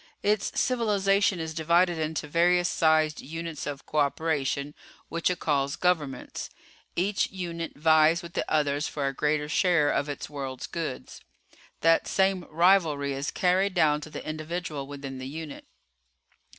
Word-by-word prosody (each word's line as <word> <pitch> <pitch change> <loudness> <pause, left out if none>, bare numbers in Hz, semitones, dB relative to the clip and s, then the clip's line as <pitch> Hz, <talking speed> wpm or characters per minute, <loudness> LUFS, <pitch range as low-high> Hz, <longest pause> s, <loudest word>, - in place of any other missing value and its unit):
"Its 210 -1 +1
civilization 200 -6 +2
is 160 -1 -4
divided 170 +2 +2
into 155 0 -2
various 175 +3 +3
sized 155 -2 +2
units 165 0 -6
of 145 -1 -6
cooperation 145 -1 0 0.4
which 170 +1 0
it 180 - -1
calls 140 -2 0
governments. 155 -8 -1 0.5
Each 195 +3 +1
unit 170 -3 -5
vies 160 +2 +4
with 170 0 -9
the - - 0
others 150 -1 +1
for 145 -2 -3
a 135 - -1
greater 150 +1 0
share 150 -2 +3
of 140 +1 -1
its 145 - -5
world's 135 -3 -5
goods. 165 -6 -6 0.6
That 165 0 +4
same 190 -2 +1
rivalry 160 -4 +3
is 135 +1 -3
carried 185 +2 +1
down 150 -3 +3
to 155 - -8
the - - -8
individual 155 -2 -4
within 140 -2 -7
the 130 - -6
unit. 155 +1 -8
160 Hz, 145 wpm, -27 LUFS, 145-175 Hz, 0.6 s, vies